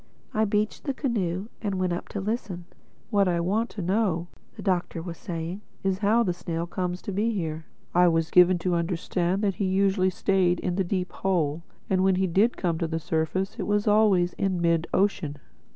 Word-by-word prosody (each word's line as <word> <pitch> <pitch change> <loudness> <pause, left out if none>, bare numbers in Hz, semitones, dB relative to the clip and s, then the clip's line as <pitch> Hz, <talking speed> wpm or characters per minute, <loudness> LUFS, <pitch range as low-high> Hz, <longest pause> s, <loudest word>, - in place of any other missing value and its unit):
I 220 0 +2
beached 210 +1 -1
the 275 -3 -1
canoe 205 - -1
and 200 -3 -1
went 185 -1 0
up 175 - -5
to 205 - -4
listen. 195 -4 -3 0.5
"What 200 -2 +3
I 175 -1 +1
want 205 +7 0
to 200 - -6
know," 180 -3 0 0.3
the - - -9
Doctor 180 -3 0
was 165 0 -6
saying, 170 +3 -5 0.2
"is 190 -1 0
how 220 +3 +3
the 180 -5 0
snail 170 -1 -3
comes 180 +1 -3
to - - -4
be 210 +4 +1
here. 160 -7 -3 0.3
I 180 0 +5
was 165 -1 +1
given 180 0 +6
to 180 - +2
understand 175 +2 -1
that 200 -2 +2
he - - +2
usually 190 0 +2
stayed 180 -1 +1
in 180 -1 -2
the 190 - +1
Deep 180 0 -2
Hole; 170 -5 0 0.3
and 190 - +1
that - - +3
when 190 -1 +4
he 190 +1 +2
did 200 +7 +2
come 170 -3 -1
to 165 - 0
the 160 0 -2
surface 165 +4 -2
it - - -2
was 205 +1 +1
always 205 -4 +4
in 190 -2 0
mid 170 -1 +2
ocean." 190 -7 0
185 Hz, 205 wpm, -26 LUFS, 170-200 Hz, 0.5 s, given